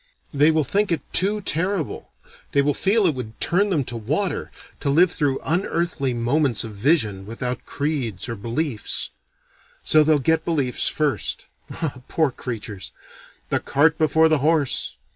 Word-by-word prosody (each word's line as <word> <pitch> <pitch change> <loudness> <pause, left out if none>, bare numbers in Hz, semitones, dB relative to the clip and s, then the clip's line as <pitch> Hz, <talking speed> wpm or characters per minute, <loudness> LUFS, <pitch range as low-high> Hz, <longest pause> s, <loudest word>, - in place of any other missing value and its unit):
They 145 +2 +5
will 160 -1 +2
think 200 +8 0
it 165 - 0
too 205 +3 +1
terrible, 180 -2 -2 0.4
they 140 - +4
will 145 +1 +2
feel 200 +7 +2
it 165 - +3
would 115 -4 -7
turn 200 +4 +2
them 160 -7 +1
to 120 - -6
water, 145 - -2 0.3
to 145 - -1
live 170 +5 +4
through 140 -3 0
unearthly 170 -5 0
moments 120 +1 +1
of 115 - -6
vision 105 - +1
without 125 +2 -4
creeds 140 - -2
or 115 - -3
beliefs. 115 +3 -2 0.7
So 155 0 +5
they'll 155 0 +4
get 160 +4 +1
beliefs 140 -7 0
first. 150 -3 -1 0.2
Ah, 150 -6 -4
poor 155 -4 +1
creatures! 110 -6 -6 0.6
The - - +1
cart 155 +3 +2
before 160 +1 +4
the 155 -2 +2
horse! 150 -1 +1
145 Hz, 155 wpm, -23 LUFS, 125-165 Hz, 0.7 s, They